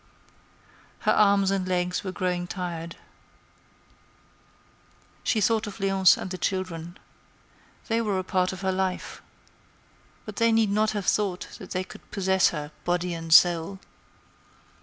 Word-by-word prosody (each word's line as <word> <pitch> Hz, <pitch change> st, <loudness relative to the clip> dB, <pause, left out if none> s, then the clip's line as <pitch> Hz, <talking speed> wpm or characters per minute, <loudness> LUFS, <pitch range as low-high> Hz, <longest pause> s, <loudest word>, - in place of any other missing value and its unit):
Her -, -, +2 dB
arms 200 Hz, -2 st, +4 dB
and 190 Hz, -2 st, -1 dB
legs 180 Hz, 0 st, -1 dB
were 190 Hz, -, -4 dB
growing 180 Hz, -2 st, -2 dB
tired. 170 Hz, -2 st, -5 dB, 2.3 s
She 225 Hz, -, +1 dB
thought 220 Hz, +1 st, +1 dB
of 205 Hz, -, -8 dB
Léonce 195 Hz, -1 st, +4 dB
and 185 Hz, -, -6 dB
the 185 Hz, -, -5 dB
children. 175 Hz, -2 st, -3 dB, 0.9 s
They 230 Hz, 0 st, +1 dB
were 210 Hz, -4 st, -1 dB
a 185 Hz, -, -1 dB
part 185 Hz, -1 st, 0 dB
of 190 Hz, 0 st, -8 dB
her 190 Hz, -1 st, 0 dB
life. 185 Hz, 0 st, -3 dB, 1.0 s
But -, -, -9 dB
they 230 Hz, -1 st, +3 dB
need 225 Hz, -2 st, +3 dB
not 215 Hz, +1 st, +2 dB
have 200 Hz, -, -3 dB
thought 195 Hz, -4 st, 0 dB
that 190 Hz, -, -10 dB
they 185 Hz, 0 st, -2 dB
could -, -, -14 dB
possess 190 Hz, -1 st, +2 dB
her, 150 Hz, -2 st, -6 dB
body 175 Hz, 0 st, -1 dB
and 165 Hz, -1 st, -6 dB
soul. 175 Hz, +2 st, +5 dB
185 Hz, 140 wpm, -26 LUFS, 180-200 Hz, 2.3 s, soul